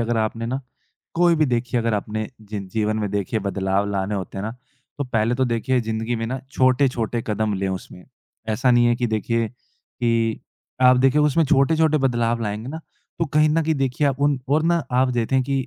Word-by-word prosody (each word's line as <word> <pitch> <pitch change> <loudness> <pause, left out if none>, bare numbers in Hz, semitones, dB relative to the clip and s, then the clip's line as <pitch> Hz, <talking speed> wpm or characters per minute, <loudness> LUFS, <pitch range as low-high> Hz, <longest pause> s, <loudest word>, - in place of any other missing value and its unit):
अगर 115 0 0
आपने 110 +1 -1
ना 130 +3 -2 0.5
कोई 175 0 +4
भी 155 -1 +3
देखिए 125 0 0
अगर 115 -1 0
आपने 105 +1 -3
जी 105 -1 -6 0.2
जीवन 110 0 0
में 105 -2 -2
देखिए 100 +2 -1
बदलाव 100 0 -1
लाने 100 +1 -1
होते 95 0 -5
हैं - - -3
ना। 110 - -3 0.5
तो 145 - -1
पहले 115 -2 0
तो 130 +1 +1
देखिए 125 +1 0
ज़िंदगी 110 +1 -2
में 115 0 -3
ना 130 +3 -3
छोटे-छोटे 125 -4 +1
कदम 105 -1 0
लें 95 0 -1
उसमें। 90 -1 -7 0.4
ऐसा 120 +4 +2
नहीं 120 -1 +5
है 120 0 +3
कि 120 0 0
देखिए 115 +1 -1
कि 115 -1 -3 0.4
आप 125 0 +7
देखिए 135 +3 +3
उसमें 150 +2 +3
छोटे-छोटे 155 +3 +3
बदलाव 120 -3 +1
लाएँगे 105 +3 -4
ना, 160 +3 -6 0.4
तो 165 - +1
कहीं 150 +1 +3
न 160 +2 +2
कहीं 160 0 +1
देखिए 135 +1 0
आप 135 0 -3
उन 145 -1 +2
और 150 +3 +3
ना 170 0 +2
आप 130 +1 +3
देखें 125 +2 +1
कि 135 0 -1
120 Hz, 205 wpm, -22 LUFS, 110-135 Hz, 0.5 s, आप